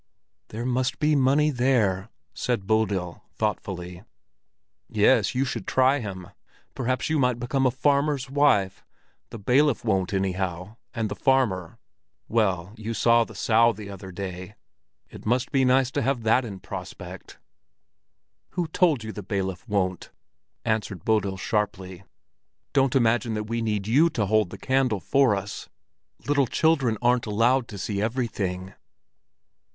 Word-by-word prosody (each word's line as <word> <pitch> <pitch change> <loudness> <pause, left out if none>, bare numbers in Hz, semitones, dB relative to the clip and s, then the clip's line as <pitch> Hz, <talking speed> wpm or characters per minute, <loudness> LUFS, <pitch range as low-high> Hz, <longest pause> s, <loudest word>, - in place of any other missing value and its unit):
"There 115 +3 -6
must 130 0 0
be 150 0 +2
money 140 +3 +3
there!" 115 -7 +1 0.2
said 120 -6 -2
Bodil, 100 -5 0
thoughtfully. 90 -4 -3 0.9
"Yes, - - +3
you 130 +2 +1
should 130 - -5
try 130 +2 +3
him; 95 -6 -7 0.4
perhaps 130 0 -1
you 155 -1 +1
might 125 -2 +2
become 130 +2 +1
a - - +4
farmer's 140 +1 +1
wife. 130 -9 +2 0.5
The 115 - -8
bailiff 125 +5 +2
won't 95 -4 +1
anyhow; 95 +1 -2 0.2
and 115 -2 -1
the 105 - -5
farmer—well, 100 - -1
you 110 +1 -4
saw 115 +1 +4
the - - -12
Sow 115 +1 +3
the 100 -1 -9
other 95 -1 -9
day; 95 +1 -7 0.6
it - - -11
must 125 +3 +1
be 135 -3 +3
nice 130 0 +3
to 145 - -1
have 135 -4 -1
that 115 +3 +3
in 100 -4 -8
prospect." - - -9 1.2
"Who 175 -2 -1
told 155 -8 +2
you 110 - -5
that 105 - -7
the 95 - -18
bailiff 95 0 -3
won't?" 95 -3 -1 0.6
answered 110 -6 -2
Bodil 100 -3 +1
sharply. 95 -3 -3 0.7
"Don't 135 -2 +2
imagine 120 -2 +2
that 105 - -2
we 115 +2 -3
need 105 -3 -1
you 145 +10 +4
to 110 -9 -1
hold 105 -1 +2
the - - -9
candle 130 -5 +1
for 130 - +3
us! 100 +1 -6 0.6
Little 140 -2 +2
children 135 -9 +2
aren't 120 -1 +2
allowed 120 +4 +2
to 105 - -8
see 100 +1 -3
everything." 100 -6 -2
115 Hz, 145 wpm, -25 LUFS, 100-130 Hz, 1.2 s, a